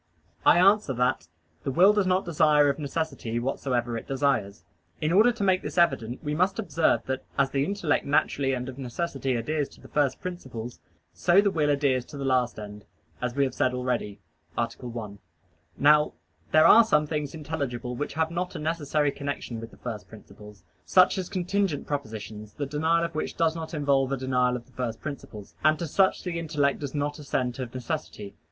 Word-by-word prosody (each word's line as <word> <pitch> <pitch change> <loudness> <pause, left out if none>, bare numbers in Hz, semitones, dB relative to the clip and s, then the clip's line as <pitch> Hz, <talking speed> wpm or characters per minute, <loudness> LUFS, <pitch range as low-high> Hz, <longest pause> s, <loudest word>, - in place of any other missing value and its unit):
I - - +7
answer 195 -4 +4
that, 125 -7 0 0.4
The - - -2
will 180 +9 +6
does 205 -3 +1
not 185 +1 +2
desire 150 -3 +4
of 140 - -1
necessity 140 -6 -3
whatsoever 120 -1 -1
it 115 - -6
desires. 125 -7 0 0.4
In 155 0 0
order 220 +6 +6
to 235 -4 -4
make 185 -1 +3
this - - -6
evident 130 -8 +1
we 150 - -2
must 185 +5 +1
observe 165 - +1
that 130 0 -3
as 135 -1 +2
the 135 0 +1
intellect 175 -2 0
naturally 140 -1 +1
and 125 0 -3
of 130 +1 -8
necessity 135 0 -2
adheres 145 +5 -1
to - - -18
the - - -14
first 145 -3 0
principles, 125 -10 -7 0.3
so 175 +2 +4
the 200 -1 +3
will 150 -4 +1
adheres 140 -3 +2
to 145 - -10
the 140 - -4
last 125 -2 +1
end, 105 -1 -9 0.4
as 125 0 -2
we 140 - +3
have 135 - -1
said 125 0 +1
already 125 -5 -2 0.4
(A. 120 - +2
1). 115 -5 -7 0.6
Now 150 +1 +5 0.4
there 155 +1 +6
are 230 +7 +9
some 150 -9 +2
things 150 -1 -3
intelligible 140 -6 -4
which 145 +2 -4
have 160 0 0
not 180 +1 -3
a - - -2
necessary 150 -2 0
connection 140 -5 -5
with 115 - -8
the - - -18
first 110 -4 -6
principles; 105 -1 -14 0.2
such 185 +1 +4
as 185 - -4
contingent 185 -3 -1
propositions, 110 -6 -6
the 145 - -3
denial 160 +4 +1
of - - -6
which 155 - -4
does 165 -1 +2
not 165 0 -5
involve 140 -2 +2
a 135 - 0
denial 125 -1 +1
of 120 -1 -6
the 130 - -24
first 120 -2 -4
principles. 120 -8 -8
And 155 +1 +4
to 170 - -3
such 190 +5 +2
the 175 -2 -3
intellect 145 -4 0
does 145 -1 -5
not 145 +1 -2
assent 130 -3 -2
of 125 -2 -4
necessity. 130 -7 -5
140 Hz, 195 wpm, -27 LUFS, 125-160 Hz, 0.6 s, are